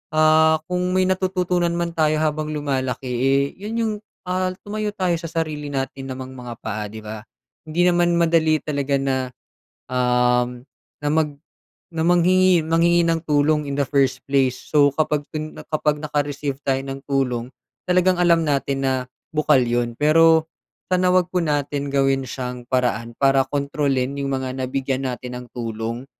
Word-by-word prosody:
ah, 155 0 +5
kung 180 0 0
may 185 - +4
natututunan 185 -2 0
man 170 0 -1
tayo 155 -2 +2
habang 155 0 -1
lumalaki 135 -3 -2
eh, 135 +3 +2 0.2
'yon 210 +3 -5
'yong 220 -1 0 0.4
ah, 185 0 0
tumayo 210 0 -3
tayo 185 -3 0
sa 165 - -6
sarili 155 -2 -3
natin 135 -1 -4
namang 130 0 -6
mga 120 -2 -7
paa, 105 0 -3
'di 110 +1 -10
ba? 110 0 -6 0.5
Hindi 170 +3 +1
naman 175 -1 +3
madali 165 -2 +2
talaga 140 -2 -1
na, 135 -1 0 0.7
um, 125 -1 +1 0.4
na 145 - 0
mag 155 -2 +2 0.6
na 160 - 0
manghingi 175 0 +4
manghingi 170 +1 +3
ng 165 -1 +1
tulong 150 +1 +3
in 140 - -3
the 140 - +1
first 135 -2 +2
place. 135 -2 +1
So 145 -2 +3
kapag 150 -1 +1
ken 155 0 -5 0.2
kapag 150 -1 0
naka-receive 145 -2 -2
tayo 135 0 +1
ng 135 0 -7
tulong, 125 -4 0 0.4
talagang 180 0 +3
alam 170 -2 +4
natin 140 -2 0
na 135 -1 +2 0.4
bukal 150 -4 +3
'yon. 120 0 -1
Pero 160 +3 +4 0.4
sana 185 0 +3
huwag 185 -1 +3
po 180 - +2
natin 145 -2 -1
gawin 135 -1 +2
siyang 125 0 -5
paraan 120 -2 0
para 135 -1 +4
kontrolin 140 -2 -1
'yong 140 0 -2
mga 130 -1 -2
nabigyan 130 +1 -2
natin 125 0 -5
ng 125 - -9
tulong. 115 +1 -4
145 Hz, 160 wpm, -22 LUFS, 130-165 Hz, 0.7 s, ah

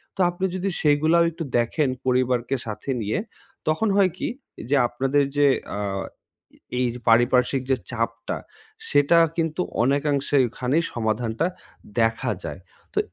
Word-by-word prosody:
তো - - -22
আপনি 175 +2 -2
যদি 185 +1 -1
সেইগুলাও 155 +2 +4
একটু 165 +1 -5
দেখেন, 125 +5 +1 0.2
পরিবারকে 125 0 +1
সাথে 110 +4 -6
নিয়ে, 105 0 -1 0.5
তখন 160 +8 +2
হয় 195 -2 +4
কি? - - -2 0.4
যে, 145 - +3
আপনাদের 135 +4 +1
যে 145 - +5 0.2
অ্যা 105 - -3 0.7
এ 125 - -6
এই 125 - +2 0.2
পারিপার্শ্বিক 125 +3 +4
যে 130 - +3
চাপটা, 115 -1 -3 0.5
সেটা 145 +4 +4 0.2
কিন্তু 165 +1 0 0.2
অনেকাংশে 140 +1 +1
ওখানেই 130 +7 0
সমাধানটা 115 +4 -1 0.6
দেখা 115 0 +1
যায়। - - -6 0.3
তো - - +1
135 Hz, 135 wpm, -24 LUFS, 120-155 Hz, 0.7 s, যে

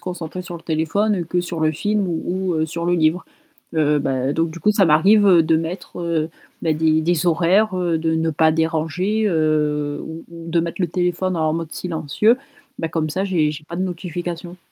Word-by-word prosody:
concentré 180 0 -6
sur 175 -1 -7
le 165 - -12
téléphone 175 +4 0
que 180 +2 -1
sur 175 -2 -5
le 155 - +3
film 205 +6 -1
ou 180 +2 -2
ou 160 - +1
sur 170 +2 -4
le 175 +1 +2
livre, 160 +2 +2 0.5
heu, 150 -1 +3
bah, 135 0 0
donc 165 +2 0
du 170 - -8
coup, 210 - +3
ça 200 -3 +4
m'arrive 195 +7 +5
de 165 -3 +5
mettre, 165 -1 -3 0.3
bah, 160 - +2
des 155 0 +2
des 170 +1 +1
horaires, 185 +4 +3
heu, 175 -2 0
de 160 0 0
ne 160 0 0
pas 160 +1 +3
déranger, 165 +7 0
heu, 150 -3 0
ou 160 +1 -8
ou 165 0 -9
de 170 - +2
mettre 170 +3 -4
le 175 - +1
téléphone 180 +1 -1
en 155 -1 +1
mode 165 0 -3
silencieux, 175 - +1 0.4
bah, 165 - -1
comme 160 -1 -1
ça 185 +5 -2
j'ai 165 -6 +1
j'ai 155 - -8
pas 170 +2 -7
de 185 - -1
notifications. 175 0 -5
165 Hz, 200 wpm, -21 LUFS, 160-180 Hz, 0.5 s, m'arrive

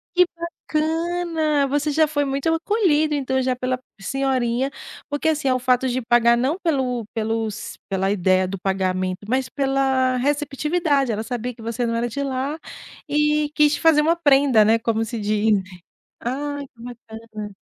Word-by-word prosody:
Que 360 0 +6
bacana, 325 -2 -1
você 290 +2 0
já 315 +1 +3
foi 290 -1 0
muito 275 +4 0
acolhido, 325 -4 +2
então, 265 -2 0
já 255 0 0
pela 255 0 -2 0.2
senhorinha. 265 +1 0 0.4
Porque, 290 +2 0
assim, 300 -3 0
é 255 - +4
o 255 - 0
fato 250 +1 +2
de 255 +1 -1
pagar 235 0 +4
não 270 +7 0
pelo 260 - -1
pelos 220 -1 -3
pela 195 0 0
ideia 185 -1 +2
do 195 0 -5
pagamento 185 -1 -1
mas 260 0 +1
pela 270 -2 +1
receptividade, 290 0 0
ela 215 +1 -2
sabia 245 +1 -4
que 225 - -15
você 230 +2 -2
não 230 - -1
era 235 +1 -1
de 280 +5 -4
lá, 275 +3 -3 0.5
e 300 0 +1
quis 300 -1 +4
fazer 320 -2 +4
uma 325 +3 +3
prenda, 275 -8 +4
né, 225 +2 +4
como 225 0 0
se 230 0 -5
diz. 210 0 +2 0.6
Ai, 285 +3 -3
que 235 -3 -18
bacana. 225 -3 -9
260 Hz, 165 wpm, -22 LUFS, 230-295 Hz, 0.6 s, Que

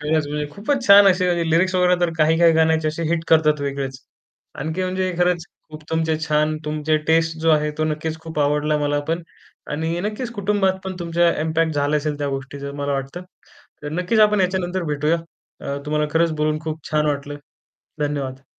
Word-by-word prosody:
खरंच 150 0 0
म्हणजे 150 0 -3
खूपच 250 - -2
छान 200 0 +8
असे 185 -1 +3 0.2
लिरिक्स 185 +4 +2
वगैरे 180 0 +4
तर 175 -1 +2
काही 160 +1 +3
काही 170 -1 +6
गाण्याचे 160 -1 +2
असे 155 +2 -4
हिट 165 -1 0
करतात 155 -2 +4
वेगळेच, 135 -2 -3 0.6
आणखी 160 +6 -3
म्हणजे 185 0 -1
खरंच 175 -2 +1 0.3
खूप 155 0 -10
तुमचे 160 -1 0
छान 150 +1 +1
तुमचे 155 +1 0
टेस्ट 165 0 +2
जो 165 0 +3
आहे 150 -1 +2
तो 155 - +1
नक्कीच 155 +1 -3
खूप 160 -1 -7
आवडला 150 +1 +1
मला 145 0 0
पण 165 +2 -1 0.5
आणि 160 +3 -2
नक्कीच 215 +5 -3
कुटुंबात 200 -2 +1
पण 190 - -4
तुमचा 170 0 +2
इम्पॅक्ट 160 0 0
झाला 145 +1 +1
असेल 150 0 -2
त्या 145 -1 -2
गोष्टीचं 140 +1 -6
मला 145 0 -2
वाटतं. 135 +6 -4 0.6
तर 145 - -4
नक्कीच 180 +7 0
आपण 210 -1 +5
याच्यानंतर 185 0 -1
भेटूया. 150 +3 +1 0.4
अ, 140 - -3
तुम्हाला 150 0 0
खरंच 165 0 +3
बोलून 155 0 0
खूप 160 -1 -4
छान 150 0 +2
वाटलं. 145 -1 -2 0.6
धन्यवाद. 140 -3 -3
160 Hz, 180 wpm, -21 LUFS, 150-175 Hz, 0.6 s, छान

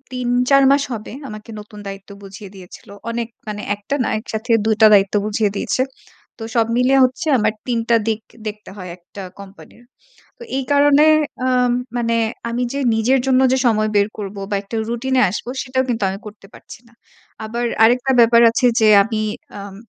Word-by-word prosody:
৩ 250 -1 -3 0.2
৪ 275 0 +5
মাস 280 0 +3
হবে। 215 -1 -7 0.2
আমাকে 215 +1 -10
নতুন 210 0 -12
দায়িত্ব 195 +1 -9
বুঝিয়ে 195 0 -11
দিয়েছিল। 185 +1 -14 0.2
অনেক 230 0 -3 0.2
মানে, 210 -1 -5
১ 205 - -9
টা 280 - +1
না - - -1
একসাথে 220 +1 -5
২ 220 - +2
টা 215 - +9
দায়িত্ব 195 0 +3
বুঝিয়ে 215 0 0
দিয়েছে। 255 - -1 0.6
তো 225 - -9
সব 230 -1 +2
মিলে 250 +2 +3
হচ্ছে 260 +6 -2
আমার 215 -1 +1
৩ 240 -2 -1
টা 235 - +4
দিক 220 0 -1 0.3
দেখতে 210 -1 -7
হয় 185 -3 -8
একটা 185 +3 -12 0.2
কোম্পানির। 200 +4 -14 0.6
তো - - -12
এই 270 - -2
কারণে 290 +1 +5 0.4
আম 250 -1 +2 0.2
মানে 230 -1 0 0.3
আমি 240 +2 -2
যে 280 - -3 0.2
নিজের 240 +4 +2
জন্য 260 -1 +3
যে 260 - +2
সময় 215 -2 +2
বের 200 0 +3
করব 200 0 -6
বা 205 - -1
একটা 205 +3 -7
রুটিনে 260 +2 0
আসব 215 - -6 0.2
সেটাও 260 0 -1
কিন্তু 235 -3 -2
আমি 195 - -6
করতে 210 -1 -12
পারছি - - -13
না। 230 - -25 0.5
আবার 235 +2 -3 0.2
আরেকটা 250 +3 +3
ব্যাপার 235 0 +5
আছে 250 +2 +1
যে 220 - +4 0.2
আমি 220 -1 -3 0.4
আম 200 -1 -9
225 Hz, 185 wpm, -19 LUFS, 210-250 Hz, 0.6 s, টা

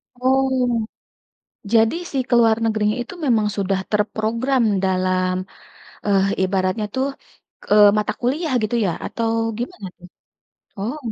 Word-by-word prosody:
Oh, 255 -3 +1 0.9
jadi 225 +4 +4 0.2
sih 270 -2 0
keluar 230 -2 +5
negerinya 215 -1 +1
itu 310 - -10
memang 220 -5 +3
sudah 195 -1 0
terprogram 225 +5 0 0.2
dalam, 185 -1 +1 0.7
eh, 195 -2 +3 0.2
ibaratnya 190 +2 0
tuh, 260 +1 0 0.6
eee, 210 0 +7
mata 210 - 0
kuliah 280 +5 -1
gitu 215 +3 -1
ya? - - +1 0.2
Atau 230 -1 -2 0.3
gimana 210 -5 -5
tuh? - - -32 0.8
Oh. 230 +9 -3
220 Hz, 120 wpm, -21 LUFS, 200-250 Hz, 0.9 s, eee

